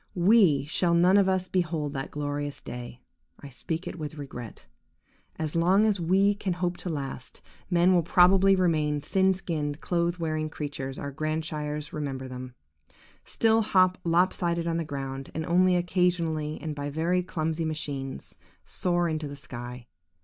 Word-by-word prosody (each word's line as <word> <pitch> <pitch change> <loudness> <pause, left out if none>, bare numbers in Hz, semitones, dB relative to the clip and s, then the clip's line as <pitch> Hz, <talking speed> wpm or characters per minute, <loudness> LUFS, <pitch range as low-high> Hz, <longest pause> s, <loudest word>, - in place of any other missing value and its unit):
We 180 -6 +4
shall 170 +3 +1
none 180 +3 +5
of 200 -1 +5
us 185 -1 0
behold 160 -6 -1
that 135 -1 -4
glorious 145 0 -4
day! 120 0 -8 0.4
I 140 - -10
speak 160 +6 -4
it 175 - -6
with 155 0 -5
regret. 125 -5 -8 0.7
As 155 -1 -3
long 185 +5 +4
as 210 -3 +1
we 190 +4 +3
can 200 -2 -2
hope 180 0 -1
to 180 - -5
last, 135 -5 -6 0.3
men 175 0 +4
will 175 - +4
probably 185 +3 +5
remain 155 -5 +1
the - - -18
thin 190 0 +3
skinned, 155 -5 -3
clothes 170 0 0
wearing 155 -2 -2
creatures 140 -3 -5
our 140 - -5
grandsires 155 0 -3
remember 135 -3 -4
them; 125 0 -8 0.7
still 225 0 +2
hop 185 -3 +3
lop 175 +2 +3
sided 170 -1 -1
on 165 -1 0
the 165 - -1
ground, 135 -2 -5
and 160 0 -2
only 180 +2 +4
occasionally, 170 -3 0
and 155 -1 -4
by 145 0 -4
very 165 +5 +1
clumsy 165 -2 -2
machines, 145 -4 -4 0.3
soar 175 -1 0
into 155 -2 -2
the 145 - -7
sky. 120 -2 -8
160 Hz, 165 wpm, -27 LUFS, 145-180 Hz, 0.7 s, none